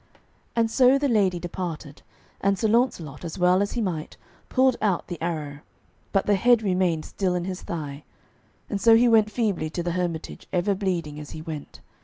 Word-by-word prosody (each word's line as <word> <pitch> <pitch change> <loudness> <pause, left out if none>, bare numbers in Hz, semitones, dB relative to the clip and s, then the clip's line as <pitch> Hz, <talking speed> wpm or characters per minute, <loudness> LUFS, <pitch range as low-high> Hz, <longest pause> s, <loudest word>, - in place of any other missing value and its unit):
And 230 -1 +2
so 255 +2 +5
the 285 +1 +1
lady 200 -7 +2
departed, 170 -4 -6 0.4
and 200 0 +2
Sir 220 - +1
Launcelot, 210 - 0
as 165 -2 -6
well 180 +1 +4
as 200 - -1
he 240 - -1
might, 170 -7 -3 0.3
pulled 260 -1 +3
out 200 -5 +1
the 175 -3 -7
arrow, 155 -4 -3 0.5
but 195 - +1
the 205 - +3
head 235 +3 +4
remained 180 -5 +1
still 185 -3 -1
in 175 -1 -2
his 185 -1 -5
thigh; 150 -3 -6 0.6
and 200 -2 -3
so 230 -1 +7
he 240 +2 +5
went 220 -2 +5
feebly 205 -9 -1
to 170 +2 -4
the 175 - -1
hermitage, 170 -2 -4
ever 185 +3 +1
bleeding 175 -6 -2
as 150 - -9
he 155 - -8
went. 155 -3 -8
185 Hz, 190 wpm, -25 LUFS, 165-215 Hz, 0.6 s, so